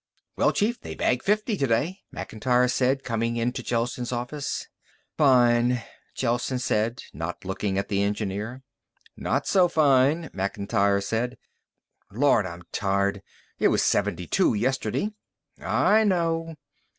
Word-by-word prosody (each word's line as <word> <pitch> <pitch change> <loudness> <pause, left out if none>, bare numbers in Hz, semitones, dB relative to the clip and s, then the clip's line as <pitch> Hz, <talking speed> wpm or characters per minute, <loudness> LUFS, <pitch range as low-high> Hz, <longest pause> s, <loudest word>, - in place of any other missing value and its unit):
"Well, - - +3
Chief, 230 +4 0
they - - -7
bagged 125 -1 +1
fifty 215 +2 +1
today," 140 - 0
Macintyre 125 +3 0
said, 130 +2 +1
coming 115 0 -1
into 120 +2 -1
Gelsen's 120 +1 -2
office. 125 +4 -4 0.5
"Fine," 125 -3 +4 0.3
Gelsen 120 +1 -1
said, 115 -1 -1
not 80 +5 -6
looking 95 +1 -2
at 100 - -1
the 100 -1 0
engineer. 105 +4 -3 0.5
"Not - - -1
so 185 -3 +4
fine." 150 +1 +3
Macintyre 100 +1 0
sat 115 +4 -1 0.8
down. 105 - -10
"Lord, 135 -9 +4
I'm 85 0 -9
tired! 100 0 0 0.4
It - - +4
was - - +2
seventy 90 +1 0
two 95 - +2
yesterday." 130 - -1 0.5
"I 220 +1 +3
know." 165 -4 0
120 Hz, 125 wpm, -25 LUFS, 100-140 Hz, 0.8 s, Fine